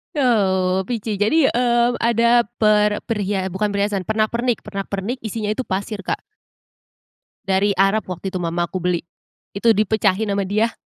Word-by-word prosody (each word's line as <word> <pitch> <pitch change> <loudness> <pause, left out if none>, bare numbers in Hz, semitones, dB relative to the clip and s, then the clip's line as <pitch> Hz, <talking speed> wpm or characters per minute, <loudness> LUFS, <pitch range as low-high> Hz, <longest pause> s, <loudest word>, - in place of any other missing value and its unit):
Oh 190 -8 +2
Pici, 220 -4 -3
jadi, 270 +8 +3
eee, 240 -1 +2
ada 235 0 +3
per 210 -1 +3
pria 205 -4 -2
eh 190 - -3
bukan 200 +4 0
perhiasan, 200 -2 -1
pernak-pernik 225 +2 0
pernak-pernik 200 +4 -4
isinya 220 -1 -3
itu 250 +4 -3
pasir, 200 +2 -3
Kak. 195 - -3 1.2
Dari 195 +1 +2
Arab 195 +2 +2
waktu 180 +2 -5
itu 185 - -2
mamaku 170 +2 -2
beli, 180 -1 0 0.5
itu 215 +4 +1
dipecahin 210 0 +1
sama 200 -1 -1
dia, 220 +3 +1
210 Hz, 145 wpm, -20 LUFS, 190-230 Hz, 1.2 s, jadi